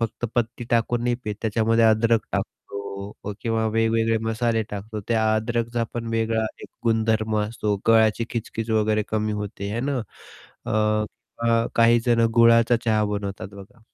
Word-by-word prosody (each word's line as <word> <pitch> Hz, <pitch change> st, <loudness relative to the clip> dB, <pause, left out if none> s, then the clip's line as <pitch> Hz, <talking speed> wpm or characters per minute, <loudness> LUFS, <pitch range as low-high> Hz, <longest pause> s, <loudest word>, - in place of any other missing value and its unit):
फक्त 115 Hz, +1 st, -3 dB
पत्ती 120 Hz, 0 st, -1 dB
टाकून 120 Hz, 0 st, +1 dB
नाही 120 Hz, 0 st, +1 dB
पीत 105 Hz, -1 st, -3 dB
त्याच्यामध्ये 115 Hz, +1 st, +2 dB
अद्रक 110 Hz, +1 st, +4 dB
टाकतो 100 Hz, +1 st, -6 dB
किंवा 115 Hz, -2 st, 0 dB
वेगवेगळे 115 Hz, +1 st, +1 dB
मसाले 115 Hz, 0 st, 0 dB
टाकतो, 105 Hz, +2 st, -6 dB
त्या 110 Hz, -2 st, +2 dB
अद्रकचा 115 Hz, +1 st, -1 dB
पण 115 Hz, -1 st, -4 dB
वेगळा 110 Hz, 0 st, +1 dB, 0.2 s
एक -, -, -9 dB, 0.2 s
गुणधर्म 110 Hz, -1 st, +1 dB
असतो, 105 Hz, -1 st, -1 dB
गळाची 110 Hz, 0 st, +4 dB
खिचखिच 115 Hz, -1 st, -4 dB
वगैरे 110 Hz, -1 st, +2 dB
कमी 110 Hz, 0 st, -1 dB
होते 105 Hz, -1 st, -5 dB
है 115 Hz, -, -2 dB
ना. 135 Hz, -, 0 dB, 0.7 s
अ, -, -, -2 dB, 0.7 s
अ, 115 Hz, 0 st, +3 dB
काहीजण 115 Hz, 0 st, +4 dB
गुळाचा 115 Hz, 0 st, +5 dB
चहा 110 Hz, -2 st, +2 dB
बनवतात 100 Hz, -2 st, -4 dB
बघा 100 Hz, +5 st, -13 dB
115 Hz, 140 wpm, -24 LUFS, 110-115 Hz, 0.7 s, गुळाचा